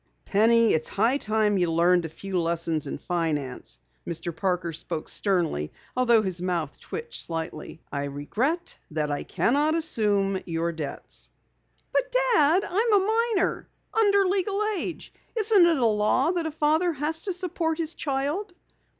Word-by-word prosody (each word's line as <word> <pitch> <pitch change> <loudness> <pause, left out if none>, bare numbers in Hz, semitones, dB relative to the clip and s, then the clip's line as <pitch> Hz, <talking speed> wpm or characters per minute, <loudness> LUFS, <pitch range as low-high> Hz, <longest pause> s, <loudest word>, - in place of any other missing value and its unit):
"Penny, 225 +2 +4
it's 155 - 0
high 230 +7 +2
time 215 -3 +1
you 175 -2 +1
learned 170 +1 +3
a - - -4
few 190 +3 -3
lessons 165 -2 -1
in - - -4
finance." 150 - -3 0.3
Mr. 170 0 -4
Parker 180 -1 -1
spoke 165 0 -5
sternly 170 - 0 0.2
although 240 -3 +4
his 185 -3 -2
mouth 175 -5 -2
twitched 470 0 -5
slightly. 160 -1 -5
"I 140 0 -2
regret 225 - -2
that 150 -1 -2
I 145 - -2
cannot 295 +5 +1
assume 205 - +1
your 165 0 -1
debts." 160 -3 -7 0.6
"But - - +1
Dad! 425 -9 +3
I'm 435 +4 +1
a 445 +4 +2
minor 370 - -1 0.2
under 405 -3 +4
legal 390 +1 0 0.2
age. 340 - -5 0.2
Isn't 425 -4 +5
it 330 -3 +3
a 250 - +2
law 215 +7 +2
that 345 -3 -1
a - - -4
father 315 +3 +2
has 305 +3 -2
to 395 - -4
support 340 -3 -2
his 330 -1 -2
child?" 295 +8 -2
225 Hz, 150 wpm, -26 LUFS, -, 0.6 s, Isn't